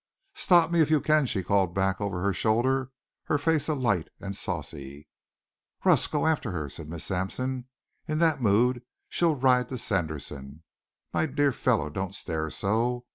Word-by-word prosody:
"Stop 170 -2 +4
me 170 -1 +4
if 155 - +3
you 155 -1 +4
can," 150 -1 +3
she 95 -5 -1
called 95 -1 +1
back 95 0 0
over 100 -3 -2
her 100 0 +2
shoulder, 120 +7 +1 0.4
her 145 - +1
face 150 0 +1
alight 120 - +1
and 100 0 -5
saucy. 70 -2 -6 0.8
"Russ, - - +4
go 150 0 -1
after 160 -7 +1
her," 75 -6 -3
said 75 +2 -9
Miss 85 -1 -6
Sampson. 125 +7 -3 0.4
"In 155 -1 -1
that 160 -4 +2
mood 120 +3 +3 0.3
she'll 170 -3 +2
ride 125 -2 +3
to 130 - -4
Sanderson. 75 - -4 0.5
My 160 - +1
dear 145 0 +2
fellow, 110 - 0
don't 95 +4 -4
stare 80 -4 -3
so. 120 +7 -1
115 Hz, 165 wpm, -27 LUFS, 90-140 Hz, 0.8 s, Stop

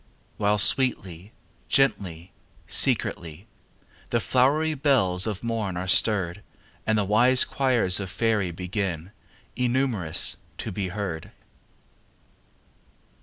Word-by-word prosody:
While 105 0 +1
sweetly, 100 -5 +2 0.4
gently, 95 -10 0 0.3
secretly, 85 +3 0 0.6
The 120 - +1
flowery 145 +7 +1
bells 120 -11 +1
of 105 -1 -4
morn 110 -6 -3
are 90 +1 -4
stirred 95 -1 +1 0.5
And 110 0 +2
the 105 - 0
wise 125 +6 +4
choirs 120 -9 +1
of 100 -2 -5
faery 105 0 0
Begin 90 0 -4 0.4
(innumerous!) 120 -9 0 0.2
to - - -5
be 95 0 -3
heard. 90 -4 -5
100 Hz, 100 wpm, -25 LUFS, 90-120 Hz, 0.6 s, wise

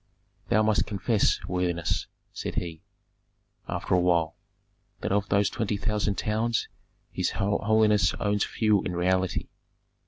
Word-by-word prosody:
"Thou 110 +2 +4
must 110 -1 +2
confess, 105 +1 +1
worthiness," 90 -2 -1 0.3
said - - -5
he, 80 -2 -4 0.9
after - - -2
a 90 - +5
while, 85 -3 +2 0.7
"that - - -2
of 100 +1 +1
those 100 0 +3
twenty 105 -2 -2
thousand 105 -1 -1
towns 110 +2 0 0.4
his - - 0
holiness 105 +1 +2
owns 105 -1 0
few 105 -3 +2
in 90 - -4
reality." 95 +1 0
100 Hz, 125 wpm, -27 LUFS, 90-105 Hz, 0.9 s, a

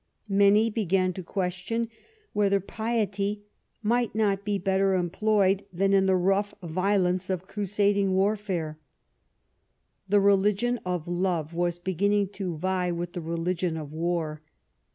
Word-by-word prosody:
Many 200 +3 +4
began 190 -3 +1
to 185 - -6
question 190 +5 -2 0.5
whether 200 -1 +2
piety 205 -1 -2 0.4
might 235 +2 +1
not 200 -3 +1
be 205 -1 0
better 190 0 +1
employed 195 +2 +2
than 195 +2 +1
in 195 -1 +4
the 190 - +4
rough 195 +3 +1
violence 185 +1 0
of 185 -1 -2
crusading 200 -1 +1
warfare. 190 -6 -1 1.3
The 205 +1 +5
religion 200 +4 +2
of 180 -3 -2
love 175 -3 -1
was 175 0 0
beginning 195 +3 +1
to 185 -5 -4
vie 180 +1 0
with 175 0 -4
the 175 - -4
religion 170 +1 -2
of 150 -2 -7
war. 160 -2 -2
190 Hz, 130 wpm, -27 LUFS, 175-205 Hz, 1.3 s, The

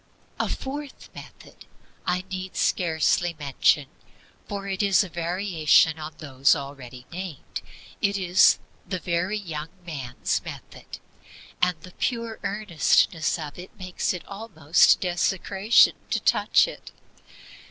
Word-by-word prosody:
4. - - +1
A - - -5
fourth 280 +1 -6
method - - -13 0.4
I 180 +1 0
need 185 0 -5
scarcely 170 0 +1
mention, 140 0 +2 0.6
for 200 -1 -5
it 195 0 -2
is 200 -2 +4
a 190 - -7
variation 170 -2 +2
on 155 +1 -6
those 140 -2 +2
already 135 -3 -8
named. 180 -5 -6 0.4
It 200 0 +1
is 185 -1 +5 0.3
THE 185 - -1
VERY 180 +4 -1
YOUNG 160 -6 -5 0.2
MAN'S 135 -8 -3
METHOD; - - -9 0.6
and 180 -2 +2
the 180 +1 -13
pure 230 -2 -2
earnestness 175 -4 +1
of 150 0 -7
it 185 +4 -11
makes 185 -2 -2
it 180 -4 -6
almost 190 -7 +3
desecration 190 +4 +3 0.2
to - - +1
touch - - +3
it. - - -10
180 Hz, 125 wpm, -25 LUFS, 155-195 Hz, 0.6 s, is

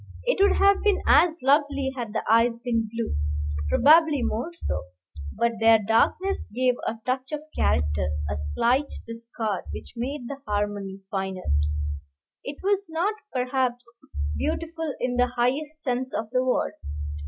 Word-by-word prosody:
It - - +1
would 400 - +5
have 400 0 +4
been 410 -2 +3
as 335 -2 +5
lovely 280 -1 +2
had 235 -4 -4
the 220 - -2
eyes 230 +1 +4
been 230 -3 0
blue, 230 0 -2 0.5
probably 305 - +5
more 240 +9 -1
so, 340 - -4 0.5
but 235 -1 0
their 225 0 +7
darkness 225 - +1
gave 255 0 +3
a 225 - -2
touch 255 +2 -2
of 300 -1 -3
character, 75 0 +1 0.2
a 70 - -2
slight 235 - +1
discord, 230 -3 -4
which - - -8
made 265 +5 -3
the 280 - -5
harmony 205 -2 -2
finer. 190 -1 -3 1.0
It 285 +1 -6
was 400 0 +1
not, 340 +6 0 0.2
perhaps, 250 -1 -1 0.5
beautiful 325 - -2
in 245 0 -1
the 250 0 +4
highest 295 +6 0
sense 255 0 -2
of 220 0 -3
the 255 0 +2
word. 255 -1 0
250 Hz, 145 wpm, -25 LUFS, 225-295 Hz, 1.0 s, their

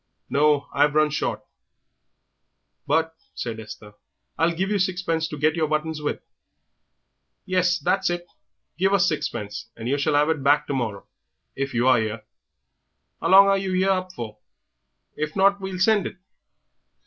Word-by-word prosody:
"No, 145 0 +3
I've 145 +1 +2
run 155 0 +3
short." 155 - -2 1.4
"But," 160 +2 +1 0.2
said 115 -2 -4
Esther, 105 -1 -10 0.4
"I'll 165 +1 +2
give 190 +4 -1
you 205 - +1
sixpence 180 -3 0
to 150 - -7
get 155 +2 +2
your 160 -2 0
buttons 155 0 -2
with." 150 - -3 1.2
"Yes, 180 -1 +2
that's 190 +4 0
it; 175 0 -3 0.5
give 195 +2 +2
us 200 - +4
sixpence, 105 -9 -3
and 115 +1 -6
yer 140 +3 0
shall 145 +1 +1
have 150 +2 +3
it 160 -3 0
back 145 +2 +3
to - - -3
morrow 110 -7 -3 0.5
if 135 -2 -3
you 120 +2 +2
are 130 -2 +5
'ere. 110 0 -3 1.0
How - - 0
long 195 +1 +9
are 195 0 +3
yer 190 0 +1
up 185 -1 -1
for? 110 -9 -8 0.8
If 155 0 -4
not, 200 +1 +3
we'll 190 -1 -5
send 205 +1 +3
it." - - -10
155 Hz, 160 wpm, -24 LUFS, 140-185 Hz, 1.4 s, long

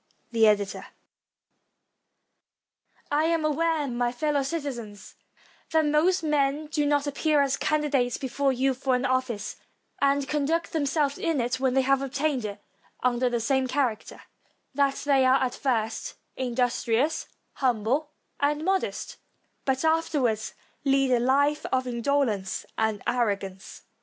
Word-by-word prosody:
The 225 -2 +4
Editor,] 205 -2 0 2.2
I 300 +2 +2
AM 330 -1 +1
aware, 315 0 +1
my 240 -1 -1
fellow 290 +3 0
citizens, 265 -8 -5 0.6
that 320 -1 +3
most 325 +5 +2
men 295 -1 +1
do 300 -1 -1
not 290 0 +2
appear 290 +1 +2
as 275 -1 +1
candidates 285 -5 0
before 275 +1 0
you 265 +1 +1
for 260 0 0
an 250 - -1
ofl&ce, 255 -5 -1 0.4
and 280 0 +2
con 295 -2 0
duct 330 +3 0
themselves 290 -2 0
in 330 -4 0
it 245 +2 -1
when 260 -1 +1
they 265 - +4
have 275 +1 +2
obtained 275 -2 -1
it 205 -1 -5 0.4
under 250 0 +2
the 240 -1 -1
same 260 +3 +1
character; 255 -4 -2 0.5
that 275 0 +2
they 275 -2 +4
are 260 +1 +5
at 255 -1 0
first 225 -4 -2 0.2
industrious, 250 +2 0 0.3
humble, 255 +4 0 0.3
and 295 +2 0
modest, 385 0 -1 0.5
but 265 +2 0
afterwards 290 -9 +1 0.3
lead 270 -1 +2
a 245 - +4
life 285 +4 +2
of 255 0 +1
indo 250 +4 +1
lence 200 -6 -3
and 220 -2 -1
arrogance. 200 -5 -2
270 Hz, 135 wpm, -26 LUFS, 245-295 Hz, 2.2 s, are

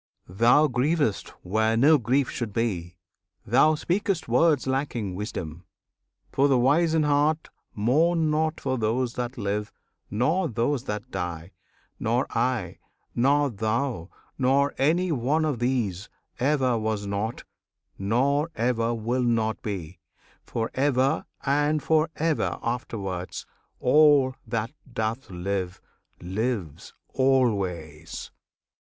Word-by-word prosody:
Thou 120 +11 +4
grievest 130 - 0
where 110 +4 +1
no 145 +5 +6
grief 125 +4 +1
should 115 -4 -4
be! 90 -7 -2 0.5
thou 135 +8 +4
speak'st 180 +2 -1
Words 140 +4 +3
lacking 130 -7 -2
wisdom! 90 -4 -5 0.7
for 140 +1 +3
the 135 -2 +3
wise 155 +6 +3
in 160 - +3
heart 150 +2 +1 0.2
Mourn 155 +9 +2
not 155 +1 0
for 130 -2 -2
those 120 +3 0
that 125 +2 -4
live, 105 -1 -2 0.4
nor 160 - +1
those 120 +3 -1
that 105 0 -5
die. 90 -1 -4 0.5
Nor 120 +3 +1
I, 125 +1 -1 0.3
nor 140 +3 +2
thou, 110 -3 -2 0.3
nor 140 +2 +3
any 170 +6 +2
one 150 +4 +1
of 145 -6 -1
these, 115 -7 -1 0.3
Ever 130 -3 +2
was 110 -2 -2
not, 100 +3 -3 0.6
nor 135 +10 +1
ever 115 -1 0
will 120 +3 -1
not 115 -3 0
be, 95 -7 -5 0.5
For 115 -1 -2
ever 135 +2 +1 0.2
and 145 +2 +1
for 160 0 +2
ever 160 -1 0
afterwards. 100 -7 -4 0.3
All, 145 -1 +5
that 115 0 -2 0.2
doth 115 +1 -3
live, 95 0 -3 0.4
lives 95 - -4
always! 95 - 0
125 Hz, 115 wpm, -26 LUFS, 105-145 Hz, 0.7 s, no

